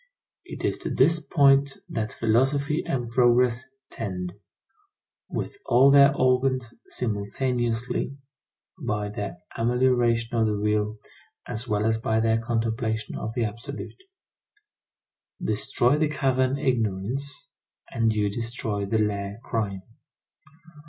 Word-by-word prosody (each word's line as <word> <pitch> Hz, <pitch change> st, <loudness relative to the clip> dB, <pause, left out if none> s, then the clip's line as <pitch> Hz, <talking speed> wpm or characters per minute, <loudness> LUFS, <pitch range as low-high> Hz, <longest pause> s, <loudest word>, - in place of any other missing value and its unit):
It -, -, -6 dB
is -, -, 0 dB
to -, -, -4 dB
this 165 Hz, 0 st, +3 dB
point 140 Hz, -1 st, +3 dB
that 110 Hz, -11 st, -3 dB
philosophy 135 Hz, +7 st, +1 dB
and 120 Hz, -3 st, -3 dB
progress 120 Hz, 0 st, +3 dB, 0.3 s
tend, 90 Hz, -5 st, -4 dB, 1.0 s
with -, -, -4 dB
all 135 Hz, +3 st, +5 dB
their 140 Hz, 0 st, +7 dB
organs 130 Hz, -2 st, +1 dB
simultaneously, 120 Hz, +3 st, -1 dB, 0.6 s
by 105 Hz, -5 st, -2 dB
their 100 Hz, -3 st, -5 dB, 0.2 s
amelioration 120 Hz, -1 st, +2 dB
of 110 Hz, -1 st, +3 dB
the 105 Hz, -, 0 dB
real, 105 Hz, +1 st, 0 dB, 0.5 s
as 115 Hz, +3 st, -5 dB
well 105 Hz, 0 st, 0 dB
as 110 Hz, 0 st, +1 dB
by 110 Hz, 0 st, +1 dB
their 115 Hz, 0 st, +2 dB
contemplation 115 Hz, -1 st, -2 dB
of 110 Hz, +2 st, -5 dB
the 120 Hz, -, +1 dB
absolute. 115 Hz, +6 st, -5 dB, 1.5 s
Destroy 125 Hz, +5 st, +1 dB
the 155 Hz, -1 st, +2 dB
cavern 135 Hz, -2 st, +1 dB
Ignorance 125 Hz, +1 st, -2 dB, 0.4 s
and 115 Hz, -1 st, +2 dB
you 105 Hz, -1 st, +1 dB
destroy 110 Hz, -2 st, -3 dB
the 110 Hz, -, +1 dB
lair 100 Hz, -1 st, -1 dB
Crime. 100 Hz, -6 st, -2 dB
115 Hz, 115 wpm, -25 LUFS, 110-130 Hz, 1.5 s, their